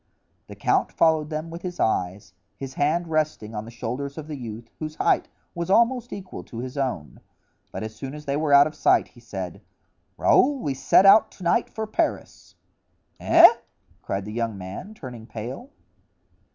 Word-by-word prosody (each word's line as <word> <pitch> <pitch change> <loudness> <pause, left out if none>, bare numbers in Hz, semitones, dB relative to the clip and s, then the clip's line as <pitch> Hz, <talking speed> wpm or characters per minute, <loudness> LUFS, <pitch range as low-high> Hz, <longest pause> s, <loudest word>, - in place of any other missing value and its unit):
The - - -10
count - - +1
followed 160 -2 +2
them 155 +1 -4
with 170 +1 -7
his 180 -1 -6
eyes, 90 -3 -1 0.2
his 135 -1 -7
hands 155 +5 +1
resting 155 -9 -1
on 105 0 -5
the - - -9
shoulders 125 +5 -5
of 155 - -6
the 155 - -5
youth, 115 -3 -8
whose 155 -1 -5
height - - +1 0.2
was 170 +1 -4
almost 235 +4 +3
equal 190 -2 -7
to 115 - -10
his 125 +3 -6
own; 130 - -3 0.5
but - - -5
as 110 0 -6
soon 135 +5 -7
as 150 0 -10
they 140 -1 -1
were 150 0 0
out 140 0 +8
of 155 - -4
sight 155 - +3
he 120 - -19
said: 95 -6 -7 0.6
"Raoul, 285 +2 +4
we 145 - -2
set 135 +8 +4
out 200 +3 +7
to 185 - -12
night 175 +7 +2
for 220 0 -4
Paris." 215 - -3 0.6
"Eh?" - - +8 0.5
cried 95 0 -3
the 105 - -7
young 115 -2 -2
man, 95 - -8
turning 125 - -9
pale. 125 - -7
140 Hz, 180 wpm, -24 LUFS, 115-165 Hz, 0.6 s, out